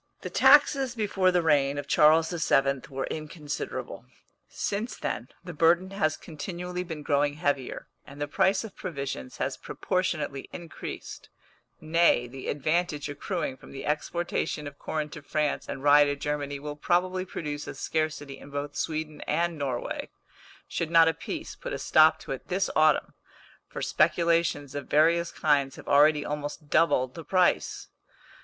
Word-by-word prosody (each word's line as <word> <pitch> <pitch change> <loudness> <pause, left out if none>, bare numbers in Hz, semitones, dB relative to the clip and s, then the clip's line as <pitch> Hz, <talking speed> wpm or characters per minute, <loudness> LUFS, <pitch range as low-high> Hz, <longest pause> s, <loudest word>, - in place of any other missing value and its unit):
The - - -6
taxes 275 -2 +5
before 195 -4 +2
the 180 -1 +2
reign 145 -3 +3
of 145 - -3
Charles 160 +2 +5
XII. 140 -5 +2
were 135 -1 -3
inconsiderable. 155 -1 -5 0.4
Since 210 +4 -3
then 115 - -3 0.2
the 175 -1 -7
burden 170 +4 +3
has 155 -6 0
continually 180 +3 -5
been 160 -4 -7
growing 145 0 +1
heavier, 145 -5 -2 0.2
and 140 +1 -12
the 145 - -2
price 190 +6 +2
of 220 - -9
provisions 140 - -5
has - - -2
proportionately 150 -7 -2
increased 170 -2 -8 0.5
nay, 160 -6 +3
the 130 +2 -8
advantage 155 +1 -1
accruing 145 0 -3
from - - -14
the 135 - -7
exportation 150 0 -2
of 145 0 -9
corn 155 -1 -3
to 155 - -9
France 150 +1 -1
and 135 - -5
rye 145 0 +7
to 145 0 0
Germany 145 0 -3
will 145 +1 -6
probably 185 +4 +1
produce 150 -5 -5
a - - -6
scarcity 155 -3 -3
in - - -12
both 145 0 -5
Sweden 155 -1 -3
and 170 +2 0
Norway, 135 -5 -3 0.6
should 165 - -2
not 165 -1 +6
a - - 0
peace - - -6
put - - -6
a - - -2
stop 155 0 +5
to - - -8
it 135 - -5
this 195 +2 0
autumn, 155 -1 +3 0.5
for - - -6
speculations 165 -5 +2
of 145 0 -5
various 170 +3 +3
kinds 140 -3 +1
have - - -12
already 150 +1 +5
almost 150 0 -5
doubled 130 -6 +3
the 165 - -8
price. 185 +2 +1
155 Hz, 155 wpm, -27 LUFS, 145-170 Hz, 0.6 s, rye